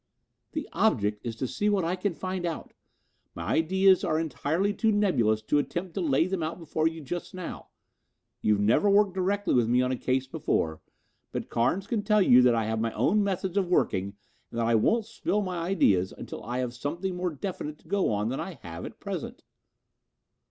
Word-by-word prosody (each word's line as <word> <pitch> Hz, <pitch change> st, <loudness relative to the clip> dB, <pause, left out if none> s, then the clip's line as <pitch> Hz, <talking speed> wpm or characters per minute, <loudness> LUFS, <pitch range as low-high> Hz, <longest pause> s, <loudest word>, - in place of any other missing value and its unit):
"The 310 Hz, -2 st, -3 dB
object 105 Hz, -, +1 dB
is 115 Hz, -2 st, -4 dB
to 130 Hz, +3 st, -3 dB
see 205 Hz, -, 0 dB
what 200 Hz, -3 st, +2 dB
I 175 Hz, +2 st, 0 dB
can 185 Hz, -1 st, -2 dB
find 185 Hz, 0 st, -4 dB
out. 170 Hz, -2 st, -4 dB, 0.6 s
My -, -, -5 dB
ideas 190 Hz, +3 st, +4 dB
are 155 Hz, -2 st, +1 dB
entirely 165 Hz, +5 st, 0 dB
too 220 Hz, +1 st, +2 dB
nebulous 120 Hz, -, +2 dB
to 145 Hz, +7 st, +2 dB
attempt 175 Hz, +4 st, -3 dB
to 190 Hz, -, -2 dB
lay 155 Hz, -1 st, +3 dB
them 185 Hz, -1 st, -2 dB
out 160 Hz, +1 st, -3 dB
before 160 Hz, -2 st, 0 dB
you 165 Hz, 0 st, -4 dB
just 175 Hz, +6 st, -5 dB
now. 185 Hz, -2 st, -7 dB, 0.7 s
You've 105 Hz, -1 st, +2 dB
never 115 Hz, -, +3 dB
worked 200 Hz, -1 st, +4 dB
directly 195 Hz, +2 st, 0 dB
with 120 Hz, -3 st, +3 dB
me 125 Hz, +1 st, +4 dB
on 125 Hz, -, 0 dB
a -, -, +1 dB
case 130 Hz, +1 st, 0 dB
before, 130 Hz, -, -1 dB, 0.5 s
but -, -, -4 dB
Carnes 170 Hz, +12 st, +1 dB
can 225 Hz, 0 st, -1 dB
tell 210 Hz, +1 st, +3 dB
you 125 Hz, -7 st, +7 dB
that 125 Hz, -1 st, +5 dB
I 115 Hz, -, +1 dB
have 110 Hz, 0 st, -1 dB
my 115 Hz, 0 st, -1 dB
own 210 Hz, +1 st, +2 dB
methods 190 Hz, -1 st, -2 dB
of 195 Hz, -3 st, +2 dB
working 100 Hz, -, +1 dB, 0.3 s
and 120 Hz, -, -5 dB
that 115 Hz, -, +1 dB
I 115 Hz, -, +2 dB
won't 215 Hz, -, +3 dB
spill 210 Hz, -2 st, -1 dB
my 180 Hz, -2 st, -3 dB
ideas 105 Hz, -, +2 dB
until -, -, -8 dB
I 120 Hz, +3 st, -3 dB
have 125 Hz, -2 st, -2 dB
something 170 Hz, +9 st, -3 dB
more 180 Hz, 0 st, -1 dB
definite 155 Hz, -1 st, -5 dB
to -, -, -24 dB
go 195 Hz, -, +1 dB
on 105 Hz, +1 st, 0 dB
than 130 Hz, -, -3 dB
I 190 Hz, -, -4 dB
have 85 Hz, -1 st, -7 dB
at -, -, -10 dB
present." -, -, -6 dB
165 Hz, 205 wpm, -28 LUFS, 120-190 Hz, 0.7 s, you